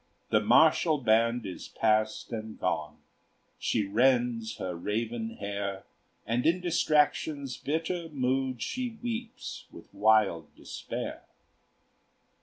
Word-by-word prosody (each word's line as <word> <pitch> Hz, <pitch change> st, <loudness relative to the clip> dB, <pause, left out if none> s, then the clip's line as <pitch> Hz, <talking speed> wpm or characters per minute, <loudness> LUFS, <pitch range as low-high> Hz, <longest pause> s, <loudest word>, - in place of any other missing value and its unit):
The 110 Hz, -, +5 dB
martial 155 Hz, +7 st, +5 dB
band 115 Hz, -1 st, +2 dB
is 95 Hz, -, -7 dB
past 110 Hz, 0 st, 0 dB
and 110 Hz, -1 st, -6 dB
gone; 75 Hz, -2 st, -2 dB, 0.6 s
She 105 Hz, -3 st, 0 dB
rends 120 Hz, 0 st, +2 dB
her 90 Hz, -1 st, -3 dB
raven 115 Hz, +5 st, -3 dB
hair, 100 Hz, -1 st, -4 dB, 0.4 s
And 115 Hz, +3 st, 0 dB
in 170 Hz, +3 st, +3 dB
distraction's 150 Hz, -5 st, +1 dB
bitter 165 Hz, +3 st, -2 dB
mood 130 Hz, -3 st, -1 dB
She 250 Hz, -3 st, -3 dB
weeps 235 Hz, -1 st, -5 dB
with -, -, -14 dB
wild 105 Hz, -7 st, +2 dB
despair. -, -, -6 dB
120 Hz, 105 wpm, -29 LUFS, 110-150 Hz, 0.6 s, The